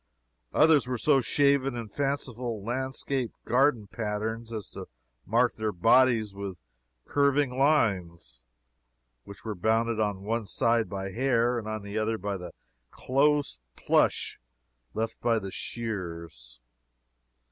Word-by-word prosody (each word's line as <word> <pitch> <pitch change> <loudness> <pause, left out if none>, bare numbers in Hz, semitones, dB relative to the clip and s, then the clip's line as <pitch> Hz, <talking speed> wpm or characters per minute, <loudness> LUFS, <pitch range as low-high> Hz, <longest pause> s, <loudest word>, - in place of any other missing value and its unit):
Others 155 -5 +4
were 125 -1 -2
so 135 +2 +3
shaven 140 0 +2
in 115 -2 -5
fanciful 125 -3 -3
landscape 130 +1 -2
garden 125 -3 +3
patterns, 110 +2 -4
as 110 -4 -5
to - - -8 0.4
mark 120 +4 +3
their 110 -1 -2
bodies 115 +2 +4
with 100 -2 -6 0.5
curving 140 -2 +2
lines, 95 - +1 0.8
which 100 +2 -12
were 110 - -2
bounded 110 +4 +1
on 105 -3 -1
one 110 0 -2
side 115 0 +1
by 95 0 -4
hair 120 0 +1
and 110 - -8
on 110 -1 -4
the 100 +2 -3
other 110 +1 0
by 100 0 -3
the 90 -2 -7 0.4
close 140 - +1 0.2
plush - - +1 0.6
left 110 +1 -3
by 115 -1 +2
the 100 -3 -4
shears. 85 - -6
115 Hz, 125 wpm, -28 LUFS, 100-130 Hz, 0.8 s, Others